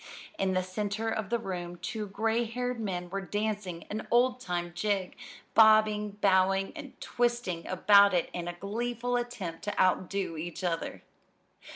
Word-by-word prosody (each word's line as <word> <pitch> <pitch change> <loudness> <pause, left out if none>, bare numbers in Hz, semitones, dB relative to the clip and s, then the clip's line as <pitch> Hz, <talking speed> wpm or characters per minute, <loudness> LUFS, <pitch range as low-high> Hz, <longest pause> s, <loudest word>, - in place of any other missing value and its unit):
In 190 -1 +1
the 185 - +2
center 205 +4 -2
of 220 -3 -2
the 235 - +2
room 180 -5 -5
two 215 +4 -4
gray 225 +4 0
haired 245 +1 -3
men 180 -5 -3
were 195 0 -2
dancing 205 -3 -3
an 215 +1 -4
old 250 +1 +3
time 175 -6 -3
jig, 195 0 -1 0.4
bobbing, 215 -1 +5
bowing, 195 0 +3
and 290 -4 -10
twisting 240 -8 -1
about 200 +1 +6
in 175 0 -2
a 175 - -3
gleeful 235 +6 -2
attempt 235 -9 -4
to 205 - -3
outdo 185 -1 +1
each 170 +3 -6
other. 170 -2 -2
200 Hz, 150 wpm, -30 LUFS, 185-225 Hz, 0.4 s, about